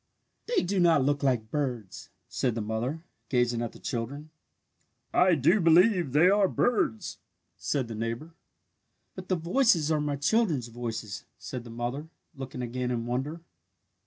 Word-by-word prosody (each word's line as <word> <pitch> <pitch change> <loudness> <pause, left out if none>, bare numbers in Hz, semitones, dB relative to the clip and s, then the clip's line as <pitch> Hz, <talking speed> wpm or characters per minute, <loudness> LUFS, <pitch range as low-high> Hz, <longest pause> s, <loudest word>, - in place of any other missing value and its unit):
"They 475 -2 +2
do 195 +2 0
look 145 -5 +3
like 125 -6 0
birds!" 125 -10 -3 0.2
said 125 -4 -1
the 115 - -2
mother, 115 +9 -3 0.3
gazing 120 -2 +1
at 120 - -3
the - - -14
children. 140 +6 -5 0.8
"I 180 -1 +5
do 155 +9 +3
believe 175 - +4
they 150 +6 +5
are 200 0 +4
birds," 185 - 0 0.4
said 135 -4 -2
the 115 - -6
neighbour. 115 +8 -4 0.8
"But 185 -1 -9
the 185 - +3
voices 170 - +2
are 155 -1 +2
my 145 -1 -1
children's 150 - +1
voices," 115 -5 -5
said 125 -2 -6
the 120 - -11
mother, 120 +6 -4 0.3
looking 130 -2 -6
again 125 +1 -3
in 120 -2 -2
wonder. 135 +7 -3
140 Hz, 150 wpm, -28 LUFS, 120-165 Hz, 0.8 s, I